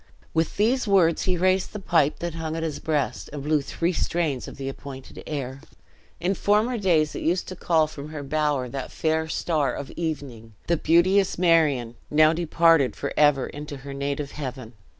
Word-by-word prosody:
With 160 0 0
these 235 +4 +2
words 180 -5 +3
he 185 -1 +1
raised 185 +1 +1
the 210 - -5
pipe 165 -6 +2
that 170 -1 -3
hung 160 -1 -4
at 165 - -3
his 160 -2 -3
breast, 150 -3 -2
and 145 -1 -6
blew 150 0 +2
three 170 +5 -1
strains 160 -6 -1
of - - -10
the 135 0 -5
appointed 135 -1 -8
air. 135 -3 -4 0.6
In 180 +4 +1
former 215 +5 +1
days 165 -6 +2
it - - -5
used 180 +3 0
to 185 - -6
call 165 -3 +2
from 150 -1 -8
her 155 -2 -6
bower 145 -2 0
that 130 +2 -6
"fair 160 0 0
star 155 -3 0
of 140 - -6
evening," 135 -9 -5
the 170 - +2
beauteous 185 +5 +3
Marion, 155 -9 +3 0.2
now 155 +1 +5
departed 165 -4 +3
for 140 - -4
ever 145 -3 +4
into 145 0 -7
her 140 - -6
native 140 +1 -3
heaven. 130 -5 -6
155 Hz, 185 wpm, -25 LUFS, 140-170 Hz, 0.6 s, now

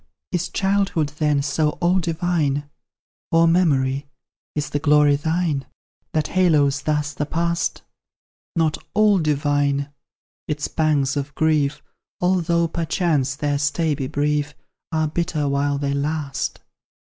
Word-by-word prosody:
Is 180 -1 -1
childhood, 195 -6 +1
then, 150 -2 +2
so 150 +1 0
all 180 +1 +3
divine? 160 -4 0 0.6
Or 165 0 +5
Memory, 145 -5 +2 0.5
is 150 0 -2
the 145 - 0
glory 150 -1 +4
thine, 160 -1 -1 0.5
That 155 -1 0
haloes 150 -6 +3
thus 150 -1 -1
the 150 - -3
past? 170 +2 -1 0.7
Not 160 -2 +1 0.2
ALL 210 -2 +5
divine; 145 -2 0 0.6
its 150 -1 -2
pangs 150 -4 +1
of 145 +1 -4
grief 150 -3 +1 0.4
(Although, 170 -2 +2
perchance, 160 -5 0
their 145 0 -1
stay 155 +2 +1
be 135 -2 -3
brief) 145 +1 -1 0.4
Are 155 -1 +1
bitter 155 -2 -1
while 140 0 +1
they 140 0 -1
last. 145 0 -2
150 Hz, 120 wpm, -22 LUFS, 145-165 Hz, 0.7 s, Or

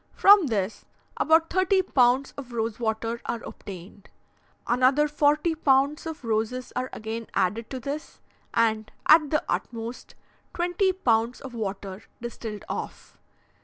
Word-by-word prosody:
From 400 -4 +7
this, 205 -3 -2 0.3
about 320 +1 +3
thirty 375 +1 +3
pounds 260 -4 +2
of 255 -3 -9
rose 225 -1 -2
water 225 0 -2
are 235 - -3
obtained. 195 +1 -10 0.6
Another 260 +5 +3
forty 300 +2 +2
pounds 285 0 +2
of 320 -4 -7
roses 225 +3 -2
are 255 +1 -2
again 225 +1 -5
added 220 +5 0
to 260 - -5
this, 280 +5 -6 0.3
and, 220 -2 +1 0.2
at 310 -1 +7
the 305 - 0
utmost, 230 +1 -4 0.4
twenty 355 +2 +1
pounds 235 -9 +1
of 265 -2 -9
water 200 -3 -5 0.2
distilled 225 -3 -7
off. - - -7
245 Hz, 130 wpm, -26 LUFS, 225-300 Hz, 0.6 s, From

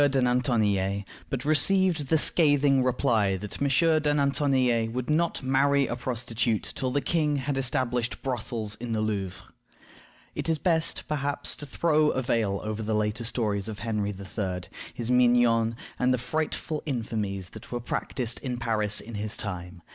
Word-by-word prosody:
de 135 0 +1
Nantonillet, 110 -6 +1 0.3
but 135 -1 -3
received 170 0 +3
the 160 - +3
scathing 145 -4 +4
reply 115 -6 +1
that 105 +6 -7
"M. 140 - +2 0.3
de 150 -1 +2
Nantonillet 130 -5 +2
would 125 +4 -3
not 165 -1 +1
marry 140 +1 +3
a 120 - -3
prostitute 120 -2 -1
till 130 - -1
the 140 +3 0
king 150 -3 +1
had 140 0 -2
established 125 -2 0
brothels 115 -4 -3
in 120 0 -4
the 110 - 0
Louvre." 95 -3 -3 0.9
It - - -3
is 160 - +2
best, 165 0 +1
perhaps, 145 -1 0
to 150 - -5
throw 155 +1 +2
a 130 - -1
veil 110 -6 0
over 110 0 -3
the 110 0 -1
later 105 +2 -1
stories 105 -4 -1
of 110 -2 -5
Henry 105 -3 -1
III., 95 -2 -4 0.3
his 120 0 -3
mignons, 120 -2 +4 0.2
and 125 0 +3
the 125 - +2
frightful 155 +3 -2
infamies 105 -7 -3
that 110 - -11
were 120 - -2
practiced 120 0 -3
in 125 -3 -4
Paris 110 -3 0
in 115 - -10
his 105 +1 -3
time. 90 -3 -5
120 Hz, 160 wpm, -27 LUFS, 110-140 Hz, 0.9 s, scathing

